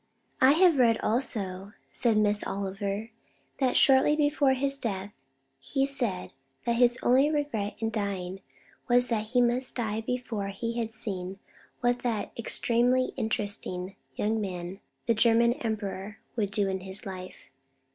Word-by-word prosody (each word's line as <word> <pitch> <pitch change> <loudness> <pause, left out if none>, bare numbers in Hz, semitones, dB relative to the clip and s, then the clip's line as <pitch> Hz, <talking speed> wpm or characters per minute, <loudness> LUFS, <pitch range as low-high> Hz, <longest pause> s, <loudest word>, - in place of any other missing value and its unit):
"I 260 +2 +7
have 345 -1 +4
read 230 -2 +4
also," 205 -5 -1 0.2
said 230 -3 +4
Miss 210 -1 +3
Oliver, 200 +3 -4 0.5
"that 260 -2 +2
shortly 270 +2 +5
before 290 -2 +2
his 275 +1 0
death 200 -3 -4 0.5
he 270 - -1
said 240 -10 -1 0.3
that 235 0 +1
his 245 0 +4
only 265 +4 +4
regret 285 -9 -2
in 225 0 -2
dying 195 -3 -3 0.5
was 245 0 +3
that 220 -2 -1
he 245 +2 +2
must 245 +2 +1
die 220 -2 -2
before 225 -4 -3
he 230 +4 -4
had 225 -1 -2
seen 195 -4 -3 0.4
what 245 0 +1
that 230 -4 -2
'extremely 245 +2 +1
interesting 205 -5 -1 0.2
young 220 +1 0
man, 180 -1 -5 0.3
the 230 - +3
German 235 +1 +4
Emperor,' 210 -3 -4 0.2
would 210 -4 0
do 205 0 0
in 190 0 -2
his 190 +3 -3
life. 185 -1 -9
225 Hz, 145 wpm, -28 LUFS, 200-245 Hz, 0.5 s, I